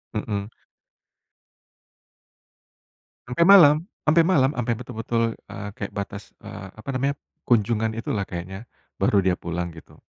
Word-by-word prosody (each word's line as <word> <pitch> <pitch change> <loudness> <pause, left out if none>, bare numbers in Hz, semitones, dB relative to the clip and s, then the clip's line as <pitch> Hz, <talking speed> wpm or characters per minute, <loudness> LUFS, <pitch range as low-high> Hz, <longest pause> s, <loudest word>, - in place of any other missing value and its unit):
mhm. 105 0 -3 2.8
Sampai 125 +8 +2
malam 170 -7 +9 0.3
sampai 160 +2 +4
malam, 140 -8 +4
sampai 120 -3 -1
betul-betul, 115 -1 -3 0.2
eee, 105 - -7
kayak 100 - -5
batas, 100 0 -6
eee, 95 - -8
apa 110 +5 -14
namanya, 135 +2 0 0.3
kunjungan 110 -1 +2
itulah 105 -3 -3
kayaknya, 95 +5 -7 0.3
baru 100 -2 +3
dia 90 -1 +1
pulang, 85 0 -4
gitu. 80 -1 -14
110 Hz, 120 wpm, -24 LUFS, 100-130 Hz, 2.8 s, malam